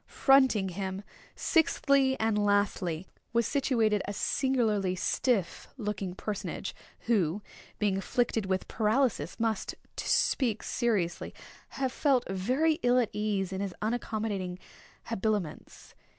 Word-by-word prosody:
Fronting 260 -8 +4
him, 190 +1 -4 0.3
sixthly 275 -4 +2
and 220 -2 +1
lastly, 200 -4 +1 0.3
was 235 -1 +3
situated 230 -6 +2
a 205 - -3
singularly 215 -6 +1
stiff 195 -1 0
looking 205 -5 -3
personage, 205 0 -4 0.3
who, 205 -4 +1 0.3
being 200 -2 +1
afflicted 225 -1 0
with 190 0 -1
paralysis, 220 - 0
must, 225 -2 -1 0.2
to - - -3
speak 230 -6 +2
seriously, 200 -8 -1 0.3
have 265 -2 -2
felt 270 -2 +2
very 255 - +1
ill 245 0 +4
at 240 -4 +2
ease 200 -3 -1
in 190 - -3
his 195 -3 -3
unaccommodating 215 -5 -2 0.5
habiliments. 210 -6 -3
215 Hz, 115 wpm, -29 LUFS, 195-245 Hz, 0.5 s, Fronting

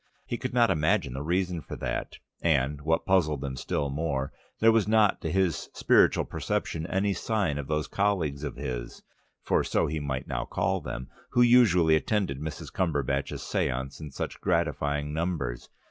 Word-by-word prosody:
He 120 - -4
could 130 - -3
not 120 -1 +4
imagine 80 -3 +1
the 65 - -4
reason 90 +2 0
for - - -8
that, - - -4 0.2
and, 75 -3 +1
what 80 +2 +1
puzzled 80 -7 +2
him 65 -2 -3
still 70 +2 -2
more, 70 -2 -2 0.3
there 115 +1 +6
was 110 -2 +2
not 110 -2 +3
to 80 - -2
his 95 -3 0
spiritual - - +4
perception 80 +1 -2
any 100 +2 +1
sign 95 -6 -1
of 70 - -5
those 75 0 -1
colleagues 85 -9 0
of 75 - -4
his - - -5 0.4
(for - - +2
so - - +1
he 75 +1 -2
might 65 -3 -3
now - - -2
call - - -1
them) 65 +2 -6 0.3
who 120 - +5
usually 100 -10 +5
attended 90 -5 0
Mrs. 75 0 -6
Cumberbatch's 70 -6 -1
séances 65 +3 -2
in 75 - -6
such 65 - -5
gratifying 75 0 0
numbers. 80 -8 -2
80 Hz, 170 wpm, -28 LUFS, 70-95 Hz, 0.4 s, there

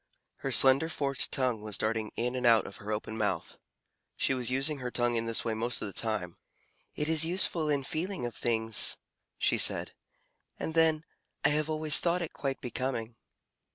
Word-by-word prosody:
Her 135 - -4
slender 135 +5 +6
forked 140 -4 -1
tongue 125 -5 0
was 105 -1 -5
darting 110 0 -2
in 125 +2 -2
and 125 - -4
out 115 -2 +4
of - - -10
her 105 +1 -8
open 110 +1 -5
mouth. 105 -1 -3 0.6
She - - 0
was 125 -2 -3
using 135 +3 -1
her 125 -1 -5
tongue 120 0 0
in 115 0 -2
this 115 +1 0
way 115 - -1
most 120 +2 -1
of - - -4
the 100 - -8
time. 100 -6 -3 0.6
"It 150 - -2
is 160 -1 +4
useful 165 -2 +1
in 140 -2 0
feeling 165 +1 -4
of 120 - -5
things," 110 -1 +5 0.4
she - - 0
said, - - +2 0.6
"and 160 - -5
then, 160 -1 +2 0.4
I - - +5
have 150 +1 -1
always 155 -1 +3
thought 175 0 0
it 165 - -7
quite 135 -1 -4
becoming." 120 -2 -4
130 Hz, 190 wpm, -29 LUFS, 115-150 Hz, 0.6 s, slender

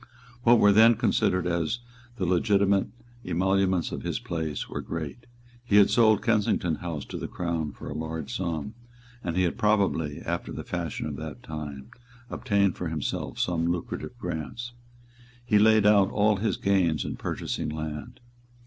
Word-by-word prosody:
What 120 0 +6
were 105 -2 +6
then 110 +3 +7
considered 95 -6 +1
as 85 +3 0 0.4
the 95 -6 -2
legitimate 100 +2 +2 0.4
emoluments 95 0 +1
of - - -4
his - - -2
place 80 -4 -4
were - - -5
great; 85 +9 -6 0.4
he 110 -4 0
had 100 -1 +6
sold 110 -3 +4
Kensington 100 -7 +1
House 80 -3 -5
to - - -6
the - - -4
Crown 85 -4 -2
for - - -10
a 75 - -4
large 80 -1 -4
sum; 85 +1 -3 0.5
and 85 0 -2
he 95 - +3
had 85 - -1
probably, 95 -8 +1
after 85 0 -3
the - - -5
fashion 85 -3 -4
of 75 -2 -4
that 80 -1 -7
time, 75 -4 -7 0.4
obtained 100 -3 +1
for 90 - -3
himself 80 -3 -3
some 85 -2 0
lucrative 85 -1 -5
grants. 120 +10 -5 0.7
He 105 -3 +4
laid 110 0 +5
out 100 -2 +5
all 105 0 +2
his 110 +3 -1
gains 90 -7 +1
in - - -4
purchasing - - -3
land. 75 -1 -6
90 Hz, 160 wpm, -27 LUFS, 80-105 Hz, 0.7 s, then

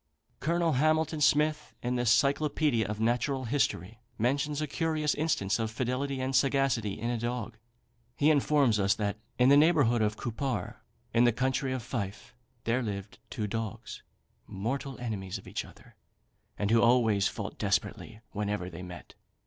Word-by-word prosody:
Colonel 170 +2 +1
Hamilton 155 +2 +1
Smith, 150 +1 +2
in 125 +1 0
the 120 0 0
"Cyclopædia 140 0 +2
of 105 0 -4
Natural 125 +4 0
History," 115 - -1 0.2
mentions 140 +5 0
a 155 - 0
curious 155 0 0
instance 120 -10 0
of 110 -1 -1
fidelity 130 +4 -2
and 130 +1 -1
sagacity 130 -6 +2
in 120 +2 -1
a 120 - -2
dog. 120 -1 -3 0.6
He 150 +2 +4
informs 140 -6 +3
us 100 0 +3
that 105 -1 -2 0.2
"in 125 +1 +5
the 140 - +7
neighbourhood 145 -7 +4
of 105 0 0
Cupar, 120 -3 -3 0.4
in 120 +1 +5
the 120 - +5
county 130 +3 -1
of 130 -2 -3
Fife, 105 -5 -5 0.3
there 120 +3 +1
lived 100 -3 -5
two 110 - -3
dogs, 110 -1 -5 0.5
mortal 130 +7 -4
enemies 100 -6 -4
to - - -13
each - - -3
other, - - -17 0.6
and 100 +1 0
who 115 0 +5
always 115 -5 +4
fought 100 -2 -6
desperately 105 +2 -2
whenever 105 -3 -3
they 85 +2 -8
met. 90 -2 -10
120 Hz, 155 wpm, -29 LUFS, 105-140 Hz, 0.6 s, the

